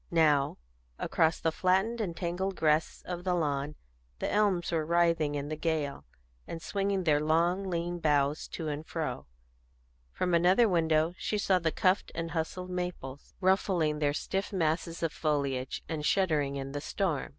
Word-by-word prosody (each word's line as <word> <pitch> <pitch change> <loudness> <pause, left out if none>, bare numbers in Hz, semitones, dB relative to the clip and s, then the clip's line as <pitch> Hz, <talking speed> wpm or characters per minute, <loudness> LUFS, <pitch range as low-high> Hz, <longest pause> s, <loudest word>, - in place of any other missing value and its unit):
Now 150 -4 +3 0.4
across 160 0 +1
the 160 - +1
flattened 190 +7 +1
and 170 -6 -3
tangled 185 +2 -2
grass 155 -1 +1
of 175 -1 -5
the 180 -1 +1
lawn 145 -2 -1 0.4
the - - -2
elms 200 -5 +2
were 165 -2 +1
writhing 165 -2 +2
in 145 0 -3
the 155 - -2
gale, 155 -3 -2 0.4
and 165 - -5
swinging 195 +2 -1
their 150 -3 +3
long 170 +5 +2
lean 175 0 -2
boughs 145 -2 +1
to 160 - -5
and 150 0 -3
fro; 155 - -4 0.8
from 180 - -1
another 180 +7 +5
window 160 -2 +2
she 210 - -1
saw 190 -2 +2
the 165 -2 0
cuffed 185 +4 +1
and 165 0 -3
hustled 180 +2 -3
maples 180 -7 -5
ruffling 180 -5 +2
their 145 -1 +2
stiff 195 +6 -2
masses 165 -2 -1
of 165 - 0
foliage, 140 -4 -1
and 155 -2 -3
shuddering 150 -6 +1
in 135 0 -4
the 145 +1 -4
storm. 170 -3 -1
165 Hz, 160 wpm, -30 LUFS, 150-180 Hz, 0.8 s, another